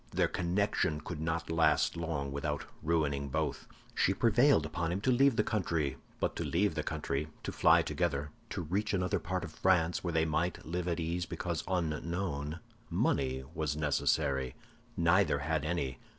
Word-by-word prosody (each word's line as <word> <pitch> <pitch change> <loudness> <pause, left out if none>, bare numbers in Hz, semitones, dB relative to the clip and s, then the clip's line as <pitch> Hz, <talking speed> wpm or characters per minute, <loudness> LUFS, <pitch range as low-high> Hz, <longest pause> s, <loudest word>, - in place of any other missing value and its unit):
Their - - +2
connection 85 -4 0
could 80 +1 -6
not 80 +1 -2
last 80 0 +3
long 80 -4 -2
without 70 +1 -2 0.2
ruining 75 -3 0
both. - - -2 0.3
She 95 - +2
prevailed 120 - +4
upon 80 +2 -2
him 90 - -1
to 130 - +2
leave 135 +1 +4
the 105 - +3
country; 85 -10 0 0.2
but - - 0
to - - -1
leave 100 +2 +1
the 80 - -1
country, 75 -1 -2 0.2
to - - -3
fly - - +5
together, 75 -4 -1 0.2
to - - -3
reach 100 +6 0
another 90 -1 0
part 90 -1 -3
of - - -6
France, 85 -3 +2
where 85 - -1
they 80 0 +3
might 80 +3 -1
live 90 +2 -3
at 85 -1 0
ease 85 +1 -2
because - - -3
unknown, 85 -2 -2 0.3
money 65 -1 0
was 75 -2 -1
necessary. 70 -3 +1 0.4
Neither 85 -1 +4
had 75 +2 -1
any. 70 -7 -2
80 Hz, 165 wpm, -32 LUFS, 75-90 Hz, 0.4 s, fly